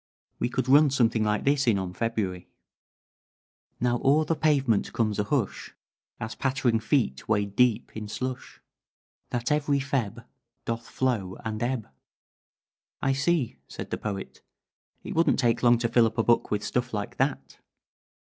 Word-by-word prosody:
We - - 0
could 130 0 -2
run 145 +3 +6
something 120 -4 +2
like 105 -1 0
this 140 -1 +2
in 110 -4 +4
on 95 -2 -4
February: 100 -5 -2 1.3
"Now 120 0 +1
o'er 150 +3 +4
the 165 - +1
pavement 135 -9 +1
comes 110 -2 0
a 105 - +1
hush 120 -4 -2 0.4
As 110 -2 -4
pattering 130 -2 +1
feet 110 - 0
wade 100 -2 0
deep 125 -2 +2
in 110 -1 -5
slush 130 +4 -5 0.7
That 120 +2 -2
every 145 -1 +2
Feb. 135 -6 -2 0.4
Doth 115 0 -4
flow 110 -8 -1
and 110 -1 -3
ebb." 120 -2 -1 1.1
"I 135 - +1
see," 140 -1 0
said - - -8
the - - -1
Poet. 100 -2 -5 0.6
"It - - -5
wouldn't 165 +1 +3
take 120 -4 +2
long 120 -1 +5
to 115 0 0
fill 115 0 +4
up 110 - -7
a 115 - +3
book 120 0 +2
with 105 0 -1
stuff 125 -2 -2
like 105 -1 -4
that." - - -2
120 Hz, 155 wpm, -27 LUFS, 110-135 Hz, 1.3 s, run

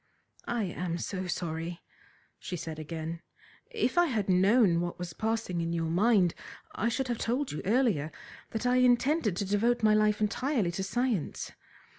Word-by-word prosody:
"I 235 -2 0
am 175 -2 -3
so 185 +2 -4
sorry," 170 -1 -3 0.6
she 180 - -5
said 160 -1 -6
again. 160 +1 -5 0.5
"If 440 - +1
I 350 - +5
had 215 -8 -1
known 190 -1 +4
what 175 0 -3
was 175 -2 -6
passing 220 -5 -1
in 170 0 -2
your 165 -1 -1
mind 190 -1 +3 0.4
I 230 - 0
should 265 +2 -1
have 240 -2 -2
told 255 +4 -1
you 150 - -4
earlier 205 - +2 0.4
that 225 +2 -4
I 250 0 +3
intended 250 - +3
to 200 - -1
devote 225 +4 +1
my 215 -1 +5
life 215 0 +3
entirely 215 - 0
to 175 - -4
science. 220 - -1
205 Hz, 165 wpm, -30 LUFS, 170-240 Hz, 0.6 s, I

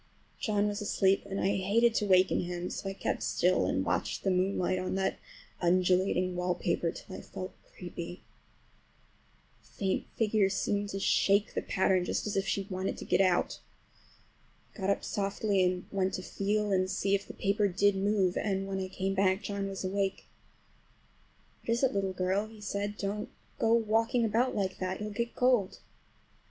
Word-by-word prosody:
John 210 -1 +1
was 205 +1 -3
asleep 195 -1 +2
and 195 0 -3
I 195 +1 +1
hated 220 +5 +3
to 210 - 0
waken 185 -1 +4
him, 175 0 -3
so 195 - -4
I - - -4
kept - - -2
still - - +2
and - - 0
watched - - -1
the 195 - +2
moonlight 185 0 +1
on 185 +1 -2
that 190 0 -1 0.4
undulating 185 +1 +2
wallpaper 175 -1 0
till 185 - -8
I - - -8
felt 185 +1 -7 0.2
creepy. 175 -1 -7 1.4
The - - -24
faint 190 -2 0
figure 215 -2 +2
behind - - -3
seemed 205 +1 -1
to 195 - -3
shake 200 +1 +3
the - - -1
pattern, 190 -1 +2
just - - -2
as 210 - -2
if 195 0 0
she 195 - -1
wanted 190 -1 -3
to - - -7
get - - +3
out. 185 -2 +2 1.1
I - - -15
got 190 0 -1
up 200 - +1
softly 200 -1 0
and 180 0 0
went 190 -1 0
to 185 - -5
feel 205 +2 -1
and 185 -1 +2
see 195 +1 0
if 200 0 0
the - - -9
paper 200 +1 +1
did 200 +2 +2
move, 195 -2 +1
and 195 -2 -1
when 195 0 -2
I 190 - -2
came 190 +1 -2
back 190 +1 +2
John 200 -1 -3
was 195 -1 -5
awake. 195 0 -1 1.4
"What 230 - 0
is 235 - -1
it, 265 - +3
little 195 -1 0
girl?" 185 +3 0
he 220 0 -14
said. 205 0 -3
"Don't 205 +2 -3 0.3
go 225 - +2
walking 230 +1 +2
about 235 +4 +1
like 190 -3 -1
that—you'll 190 +3 -3
get 235 +3 -3
cold." 245 -6 +2
195 Hz, 180 wpm, -30 LUFS, 185-205 Hz, 1.4 s, waken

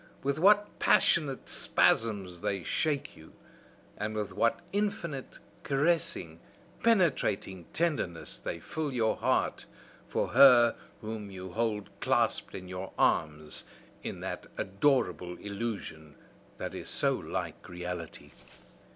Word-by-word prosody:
with 140 +2 0
what 205 +3 +4
passionate 140 -5 +3
spasms 100 -6 +1
they 100 -3 -1
shake 145 - -1
you! 80 - -15 0.6
and 105 +1 -3
with 105 -3 -3
what 115 +4 +2
infinite, 200 -9 -2 0.2
caressing, 140 - 0 0.4
penetrating 130 - +2
tenderness 150 - -1
they 85 - -4
fill 155 - -3
your 115 -4 +1
heart - - 0 0.4
for - - -1
her 125 -2 +7 0.3
whom 110 -1 -5
you 95 -1 -8
hold 105 -2 -1
clasped - - +1
in 95 -1 -7
your 90 +1 -6
arms 75 -1 +1 0.4
in - - -6
that - - -5
adorable 95 - +1
illusion 100 -8 -5 0.4
that - - -5
is - - -6
so - - +3
like - - -5
reality! 90 -2 -6
105 Hz, 115 wpm, -30 LUFS, 90-140 Hz, 0.6 s, her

